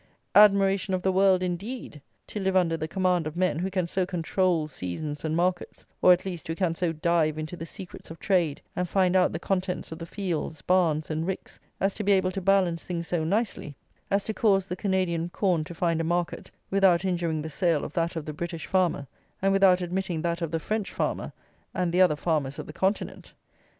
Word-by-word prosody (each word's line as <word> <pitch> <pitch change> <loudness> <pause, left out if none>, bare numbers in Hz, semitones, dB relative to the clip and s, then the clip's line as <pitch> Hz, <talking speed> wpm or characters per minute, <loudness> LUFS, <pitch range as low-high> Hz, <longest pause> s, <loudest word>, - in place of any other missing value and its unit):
"Admiration 195 -2 +5
of 180 - -4
the 190 - +2
world," 190 -1 +4
indeed, 180 - -5 0.2
to 210 - -6
live 190 -1 0
under 170 -3 +3
the 155 -1 -3
command 180 -2 +1
of 155 - -6
men 180 -4 +1
who 185 +2 -1
can 185 -2 -1
so 185 +2 -1
control 175 -2 0
seasons 145 - -5
and 160 0 -1
markets; 175 +1 -1 0.2
or, 180 - +7
at 180 +1 +3
least, 180 -4 -5
who 165 - -2
can 175 -2 0
so 170 0 -1
dive 160 -1 +1
into 155 +3 -5
the 165 -1 -7
secrets 180 +1 -10
of 165 - -8
trade, 175 -8 0
and 180 -1 -2
find 185 -1 +2
out 185 -1 +4
the - - -3
contents 185 -3 -2
of 160 - -7
the 165 - -6
fields, 170 -5 -4
barns, 165 -4 +2
and 160 +2 -2
ricks, 190 - -5 0.2
as 195 0 +1
to 215 - -4
be 200 0 +4
able 185 -1 +2
to 195 - -4
balance 185 -3 +2
things 170 -2 -4
so 170 -3 0
nicely 185 -5 -1 0.3
as 200 0 +1
to 220 - -3
cause 195 -4 +2
the 180 - -3
Canadian 185 -3 0
corn 175 -3 +1
to 170 +2 -9
find 165 -1 +1
a - - -1
market, 175 +1 -2 0.2
without 190 -2 +4
injuring 170 -4 -1
the - - -4
sale 170 -1 +1
of - - -8
that 170 0 -1
of 160 -2 -4
the 150 - -5
British 170 +1 -5
farmer, 180 -6 +1 0.3
and 195 +1 +2
without 190 -2 +5
admitting 180 -2 -2
that 170 0 -1
of 165 - -1
the 165 +1 -1
French 210 +5 -2
farmer - - -2 0.4
and 180 -2 0
the 180 +2 +3
other 180 -5 +5
farmers 150 -4 -1
of - - -6
the - - -9
continent! 195 +2 -2
180 Hz, 215 wpm, -27 LUFS, 165-190 Hz, 0.4 s, or